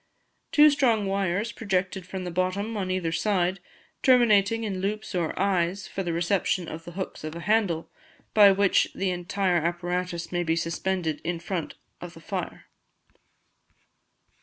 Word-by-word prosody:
Two 300 0 +7
strong 235 -7 +2
wires 195 +3 -1
project 190 -5 -1
from 190 0 -5
the 180 - -4
bottom 185 +5 -1
on 190 -3 -2
either 185 -3 -1
side, 180 +2 0 0.4
terminating 225 -4 +4
in 195 -4 -3
loops 210 +2 -3
or 170 -3 -1
eyes 190 0 0
for 195 - -4
the 175 -2 -2
reception 175 +1 0
of 165 +1 -7
the 175 - -9
hooks 190 -3 -6
of 155 +1 -5
a 170 - -6
handle, 200 -6 +1 0.5
by 205 -2 +8
which 195 0 +3
the 190 -1 0
entire 180 +1 0
apparatus 175 +1 -2
may 175 -1 0
be 165 -1 +1
suspended 165 -1 -2
in 170 0 -2
front 170 -1 -4 0.3
of - - -8
the - - -11
fire. - - -5
185 Hz, 155 wpm, -26 LUFS, 175-200 Hz, 0.5 s, by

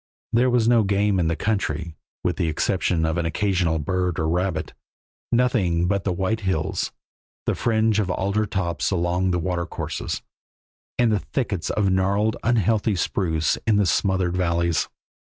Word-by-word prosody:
There 120 +2 +4
was 120 -2 +2
no 120 -1 +5
game 100 -1 +1
in 85 - +2
the 80 - +1
country, 85 -4 -2 0.3
with 90 -2 0
the 85 - 0
exception 80 +1 0
of 80 +2 0
an 85 - 0
occasional 90 -2 +1
bird 90 +3 -1
or 80 -3 0
rabbit, 90 +2 -1 0.6
nothing 105 -9 +2
but 100 0 0
the 95 - +1
white 95 +5 -1
hills, 95 -6 -1 0.5
the - - +1
fringe 110 -2 +1
of 100 -3 0
alder 100 +4 0
tops 85 -5 -1
along 90 0 0
the 90 - +1
watercourses, 85 0 -3 0.7
and 120 -2 +3
the 105 - +2
thickets 100 - -3
of 100 -3 +1
gnarled, 100 +3 +1
unhealthy 110 -2 +2
spruce 80 -2 0
in 110 - +4
the 100 -1 +3
smothered 95 -1 +1
valleys. 85 -2 +1
95 Hz, 155 wpm, -23 LUFS, 85-105 Hz, 0.7 s, no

